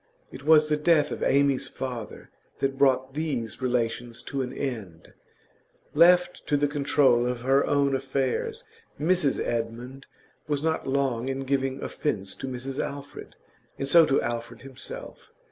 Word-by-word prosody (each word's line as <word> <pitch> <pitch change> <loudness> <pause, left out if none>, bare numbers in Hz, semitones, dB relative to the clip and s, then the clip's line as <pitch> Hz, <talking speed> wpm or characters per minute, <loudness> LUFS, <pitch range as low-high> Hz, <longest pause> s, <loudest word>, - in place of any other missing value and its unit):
It - - -9
was 155 +1 +5
the 150 0 +1
death 150 -1 +3
of - - -5
Amy's 140 -1 +2
father 125 -4 -7 0.3
that 135 0 -1
brought 135 -1 +2
these 135 -7 -3
relations 120 -1 -2
to 140 -1 -3
an 125 -1 -4
end; 110 -13 -6 0.8
left 180 +3 +4
to 145 - +2
the 145 +1 +2
control 140 -4 +2
of 125 -1 -3
her 135 +2 +3
own 140 -1 +2
affairs 135 -1 -2 0.4
Mrs 165 -2 +2
Edmund 120 +3 -4 0.4
was 145 -1 -1
not 160 -2 -1
long 135 -2 0
in 135 0 -3
giving 135 0 -1
offence 100 -10 -3
to 135 - -5
Mrs 130 +2 -5
Alfred, 140 0 -8 0.4
and 135 - -3
so 165 +3 +6
to 135 - +3
Alfred 120 +1 -5
himself. 290 - -10
135 Hz, 145 wpm, -26 LUFS, 125-145 Hz, 0.8 s, so